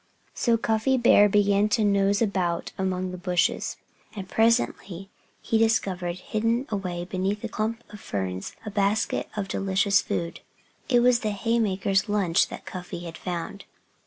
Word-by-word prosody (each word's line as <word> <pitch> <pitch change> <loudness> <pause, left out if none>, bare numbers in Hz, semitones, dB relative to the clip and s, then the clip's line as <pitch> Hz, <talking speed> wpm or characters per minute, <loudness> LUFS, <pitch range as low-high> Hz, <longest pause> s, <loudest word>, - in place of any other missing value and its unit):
So 235 -2 +2
Cuffy 225 +4 +1
Bear 210 -4 +6
began 205 0 +3
to 220 +1 +2
nose 200 +1 +2
about 180 -5 -1
among 185 -1 -2
the 180 - -7
bushes. 180 -1 0 0.4
And 195 -2 -6
presently 205 -4 0 0.3
he 225 - +1
discovered, 190 -6 +1
hidden 230 +6 -1
away 180 -4 -3
beneath 190 +3 -2
a - - -1
clump 225 +2 -3
of 210 - -9
ferns, 95 -2 -4
a 210 - -5
basket 200 +2 0
of 200 -2 -2
delicious 195 +1 +2
food. 170 0 -3 0.5
It 245 -2 +4
was 245 -1 +4
the 215 - -2
haymakers' 200 -2 0
lunch 195 -4 +2
that - - -9
Cuffy 180 -2 -7
had 170 -2 -8
found. 180 +2 -5
200 Hz, 150 wpm, -25 LUFS, 185-220 Hz, 0.5 s, Bear